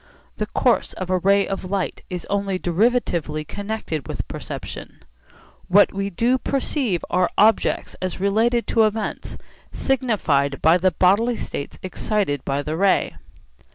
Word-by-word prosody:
The - - -2
course - - +1
of 185 -1 -5
a 185 - +2
ray 200 +2 +3
of 195 - -4
light 195 -2 -2
is 180 -2 -5
only 200 -1 -1
derivatively 175 -6 0
connected 200 -8 -4
with - - -5
perception. - - -8 0.6
What 200 +3 +5
we 195 0 -2
do 240 +7 +1
perceive 260 - -1
are 180 0 +2
objects 215 +2 +2
as 185 0 -3
related 225 +5 +2
to 225 -1 +3
events 215 0 -3 0.3
signified 200 - 0
by 165 +3 +4
the 185 +1 +4
bodily 200 +8 +3
states 140 - -6
excited 185 - -1
by 140 +1 -1
the 155 +2 -3
ray. 195 +2 +2
195 Hz, 140 wpm, -22 LUFS, 175-220 Hz, 0.6 s, What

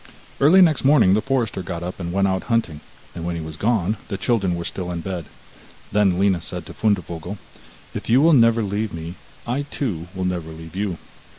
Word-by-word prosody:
Early 160 +7 +7
next 160 -4 +3
morning 135 -9 +5
the 105 - +3
forester 120 -7 -1
got 85 -2 -5
up 90 +2 -5
and 85 -2 -4
went 100 +2 +2
out 95 -1 -1
hunting, 90 -11 0 0.3
and 85 - -6
when 85 0 -2
he 85 - -4
was 80 -1 -7
gone 105 +1 +1
the 100 - -3
children 100 -3 +1
were 85 0 -4
still 90 -2 -4
in 85 -1 -3
bed. 90 -3 -4 0.7
Then 100 -3 +3
Lina 95 -2 +2
said 90 0 -5
to - - -9
Fundevogel: 90 -3 -1 0.6
'If - - -6
you 120 +3 +6
will 160 +3 +5
never 115 -3 +5
leave 100 -1 -2
me, 85 +1 -6 0.3
I 125 +4 -1
too 110 - -4
will 95 0 -2
never 90 -3 -2
leave 80 +1 -10
you. 95 -3 -2
95 Hz, 205 wpm, -22 LUFS, 85-115 Hz, 0.7 s, Early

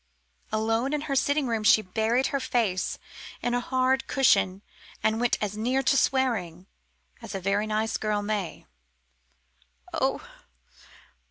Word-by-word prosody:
Alone 225 +5 0
in 300 - 0
her 290 -2 -2
sitting 285 +2 +2
room 225 -3 -1
she 215 0 +5
buried 220 +7 +1
her 275 - +1
face 225 -8 0 0.5
in 245 - 0
a 245 - +2
hard 260 +1 +1
cushion 200 -7 +2 0.4
and 220 +1 +1
went 245 - +2
as 210 -1 -3
near 250 +5 0
to 275 - +3
swearing 220 -12 0 0.6
as - - -7
a - - -2
very 200 +3 0
nice 215 +1 0
girl 210 -1 -1
may. 205 -4 -3 1.3
"Oh! - - -1
225 Hz, 140 wpm, -27 LUFS, 210-260 Hz, 1.3 s, she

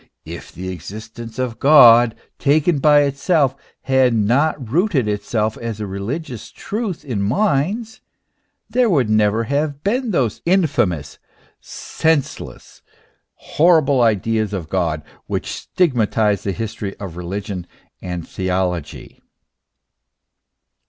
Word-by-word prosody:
If - - -9
the 95 +1 -7
exist 105 +6 -9
ence 115 -1 -8
of 125 -3 -3
God, 120 -5 +7 0.2
taken 150 +2 +2
by 145 +1 +5
itself, 140 0 +1 0.3
had 130 -2 +3
not 125 +3 +1
rooted 165 - +1
itself 105 +1 -1
as 115 -2 -5
a 105 - -3
religious 110 - -5
truth 210 -7 -5
in 120 -8 -2
minds, 200 - 0 0.7
there 250 -2 +2
would 135 - +2
never 110 +1 +2
have 145 +3 -2
been 240 +5 0
those 130 - 0
infamous, 140 - 0 0.4
senseless, 160 -4 -3 0.5
horrible 155 -5 +3
ideas 110 -1 +1
of 85 -5 -5
God 80 -5 -1 0.2
which - - -3
stigmatize 110 - 0
the 100 - -2
history 110 -1 -5
of 95 -5 -8
religion 95 +1 -5 0.3
and 90 -2 -5
theology. 90 -5 -3
115 Hz, 110 wpm, -19 LUFS, 100-150 Hz, 0.7 s, God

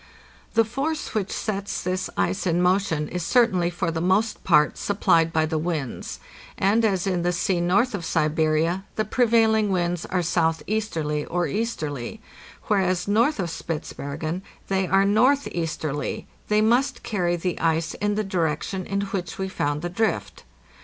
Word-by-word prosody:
The 225 0 +5
force 280 +7 -3
which 200 -3 -1
sets 200 -2 -3
this 185 +1 -2
ice 195 0 0
in 170 0 +2
motion 180 -4 +1
is 180 +3 -4
certainly 185 -4 +3
for 175 -1 -2
the 165 0 -2
most 200 +5 +1
part 150 0 +4
supplied 165 -5 +2
by 160 -1 +2
the 155 0 -1
winds; 155 -6 -3 0.4
and 210 +4 +3
as 195 -4 +1
in 185 -3 0
the 175 +1 +1
sea 175 0 0
north 200 +8 +2
of 200 -4 -3
Siberia 160 +3 +1
the 215 - 0
prevailing 220 -2 +3
winds 175 -2 -1
are 180 -1 0
southeasterly 165 -2 0
or 175 0 -1
easterly, 155 - -3 0.4
whereas 185 -3 +1
north 230 +6 +2
of 175 -3 -1
Spitzbergen 160 +1 -4 0.3
they 190 -1 +1
are 195 +1 +4
northeasterly, 200 - 0 0.2
they 210 0 +3
must 245 +4 +2
carry 175 -5 0
the 175 +1 -3
ice 165 0 +1
in 205 0 -1
the 215 - 0
direction 185 0 -2
in 200 +1 -1
which 190 -4 -4
we 190 - -2
found 145 -4 -2
the 175 - -2
drift. 215 - -2
185 Hz, 155 wpm, -24 LUFS, 165-210 Hz, 0.4 s, The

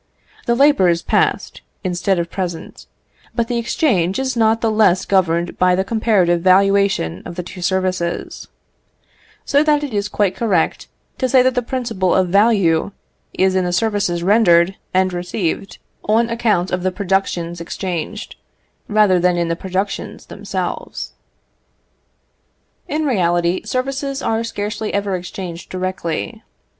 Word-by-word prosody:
The 235 - +3
labour 275 -7 +4
is 170 0 0
past, - - 0 0.2
instead 185 +1 0
of 170 0 -3
present; 175 -4 -5 0.5
but 235 -2 0
the 240 0 -1
exchange 200 - +1
is 265 -1 -1
not 225 -1 +3
the 225 - +1
less 200 -4 +3
governed 175 -3 +1
by 180 0 +4
the 190 - +1
comparative 195 -6 +2
valuation 195 - +3
of 170 - -8
the 180 - -4
two 180 +1 -10
services: 185 -1 -2 1.0
so 285 0 +3
that 300 -1 +2
it 280 -5 -4
is 205 0 -1
quite 200 -3 0
correct 195 -8 0 0.3
to 255 - 0
say 255 0 +5
that 255 0 +2
the 250 - 0
principle 230 -7 -1
of 185 -1 +2
value 200 -4 +3 0.4
is 190 0 +2
in 185 0 +1
the 180 - -1
services 190 -3 0
rendered 190 -3 +4 0.2
and 185 0 +1
received 180 +1 -3 0.3
on 230 +2 +2
account 215 -6 +1
of 180 - -1
the 185 +1 0
productions 180 -3 -1
exchanged, 170 -1 -5 0.5
rather 205 -4 +3
than 180 0 +2
in 170 -1 0
the 165 - 0
productions 190 +3 -4
themselves. - - -5 1.7
In 310 -1 -1
reality, 175 -7 +1
services 275 +2 -3
are 225 0 0
scarcely 215 -1 -4
ever 200 -1 -1
exchanged 175 -1 -7
directly. 185 - -4
190 Hz, 140 wpm, -19 LUFS, 175-225 Hz, 1.7 s, say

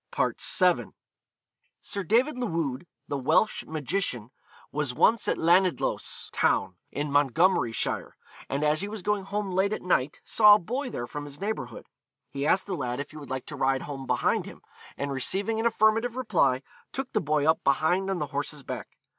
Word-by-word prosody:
VII. - - +2 0.9
Sir 200 - -4
David 245 - +2
Llwyd, 165 - -2 0.2
the 145 - -2
Welsh 145 +11 +2
magician, 150 - -2 0.4
was 145 -4 -2
once 225 - +4
at - - +1
Lanidloes 175 -2 +1
town, - - +1 0.2
in 145 0 -3
Montgomeryshire, 145 - +1 0.4
and 140 +2 -1
as 150 +2 +3
he 200 - -2
was 210 -2 -6
going 210 -2 0
home 200 0 -3
late 190 +3 +1
at - - -5
night, 150 -6 +1
saw 210 -2 +7
a - - +1
boy 250 +9 -3
there 120 - -4
from 145 +4 -6
his 145 0 -8
neighbourhood. 180 - -4 0.5
He 140 +1 -2
asked 185 +3 +3
the 200 - -4
lad 125 -6 -3
if 140 - -5
he 155 - -11
would 145 -2 -10
like 130 -1 -4
to 150 - -8
ride 135 -1 +1
home 135 -2 -7
behind - - +1
him, - - -12 0.3
and 140 0 -3
receiving 195 - 0
an 230 - +3
affirmative 225 +1 +2
reply, 160 - +1 0.3
took 270 0 -4
the 215 - +2
boy 150 -1 +1
up 160 - +3
behind 175 +7 +2
on 190 - 0
the 150 - -1
horse's 145 0 -3
back. - - -7
160 Hz, 180 wpm, -27 LUFS, 140-205 Hz, 0.9 s, saw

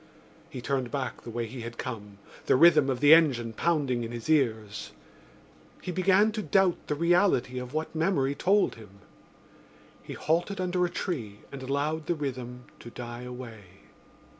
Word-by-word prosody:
He 125 - -7
turned 130 -2 -1
back 135 -1 -4
the - - -9
way 115 0 -3
he 120 +2 -8
had 115 0 -7
come, 105 -2 -6 0.3
the - - +5
rhythm 150 -1 +6
of 130 -2 -2
the 145 +1 +8
engine 130 -9 +4
pounding 140 -4 0
in 115 - -5
his 120 +5 -4
ears. 110 -7 0 0.9
He 180 - -5
began 190 +4 +3
to 215 0 -3
doubt 195 -3 +2
the 150 - -1
reality 170 -6 +2
of 125 +3 -8
what 155 +1 -2
memory 160 -4 +1
told 195 +7 +2
him. 100 -3 -15 1.0
He - - -8
halted 175 +5 -1
under 180 0 0
a - - -2
tree 120 - -4
and 140 - -8
allowed 145 +4 -2
the 175 - +1
rhythm 125 -4 -5
to 120 - -10
die 120 0 -7
away. 125 -3 -8
135 Hz, 165 wpm, -28 LUFS, 120-170 Hz, 1.0 s, the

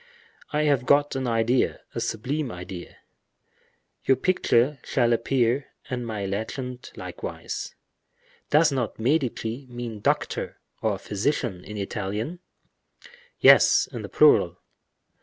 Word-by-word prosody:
"I 150 0 +1
have 140 -4 +2
got 145 0 +4
an 130 -1 -1
idea, 115 +2 +1
a - - -3
sublime 125 +5 -2
idea—your 90 +7 -6
picture 140 -5 +2
shall 120 -3 +2
appear, 125 +2 +1 0.2
and 125 -2 -3
my 105 -3 -3
legend 125 +6 -4
likewise. - - -6 0.7
Does 150 +1 +5
not 125 -5 -2
'Medici' 125 -1 -1
mean 120 -3 -6
doctor, - - -1 0.2
or 105 -3 0
physician, 105 -2 -2
in 105 - -8
Italian?" 105 - -3 1.0
"Yes, - - +7
in - - -5
the - - -7
plural." - - +5
120 Hz, 110 wpm, -25 LUFS, 110-135 Hz, 1.0 s, Yes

